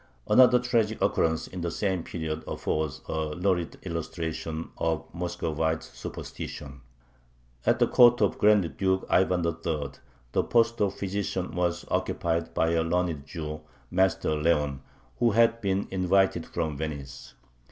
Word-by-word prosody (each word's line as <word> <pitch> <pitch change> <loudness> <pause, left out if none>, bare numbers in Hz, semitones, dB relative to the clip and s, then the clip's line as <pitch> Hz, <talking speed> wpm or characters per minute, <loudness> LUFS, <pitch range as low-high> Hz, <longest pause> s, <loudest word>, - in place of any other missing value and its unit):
Another 125 -1 +7
tragic 115 -3 +1
occurrence 80 -1 +1
in 90 - -7
the 85 - -1
same 95 -1 -1
period 80 -2 -4
affords 75 -4 -2
a 80 -1 -2
lurid 90 -2 0
illustration 80 -1 -4
of 80 -1 0
Muscovite 80 -2 -2
superstition. 70 -2 -8 0.9
At 120 +1 +4
the 120 - +4
court 120 0 +6
of 105 - +1
Grand 105 -5 +3
Duke 95 -1 +1
Ivan 90 -2 +3
III. 80 -3 -2 0.4
the - - +2
post 115 -1 +2
of 100 -1 +1
physician 95 -2 -3
was 90 0 -1
occupied 85 0 -1
by 80 0 +2
a 85 -1 +2
learned 85 -4 -1
Jew, 75 -1 -5 0.3
Master 95 -3 +2
Leon, 75 -3 +1 0.4
who 120 - +4
had 115 +1 +4
been 100 -1 0
invited 95 -2 +2
from 80 -3 -2
Venice. 70 -3 -6
85 Hz, 135 wpm, -27 LUFS, 80-95 Hz, 0.9 s, Another